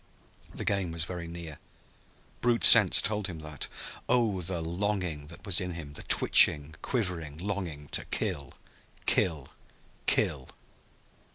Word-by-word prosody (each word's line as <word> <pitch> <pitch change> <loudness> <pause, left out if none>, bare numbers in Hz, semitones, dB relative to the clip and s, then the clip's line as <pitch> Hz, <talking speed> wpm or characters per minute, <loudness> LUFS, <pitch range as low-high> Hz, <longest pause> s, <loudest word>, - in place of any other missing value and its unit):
The - - -7
game 100 -4 -1
was 80 0 -1
very 90 -1 -7
near. 85 -3 -9 0.8
Brute 120 -1 +1
sense 105 -6 +9
told 105 -2 -2
him 90 -4 -8
that. 75 -3 -6 0.4
Oh, 115 -6 +1
the 90 0 -3
longing 85 -3 -3
that 85 +5 -12
was 95 -3 +1
in 90 -1 -5
him, 80 -4 -9
the - - -6
twitching, 75 +1 +4
quivering 90 - -3
longing 90 -6 -5
to - - -3
kill 70 -1 -4 0.5
kill 80 -7 0 0.6
kill! 65 - 0
85 Hz, 130 wpm, -28 LUFS, 80-100 Hz, 0.8 s, sense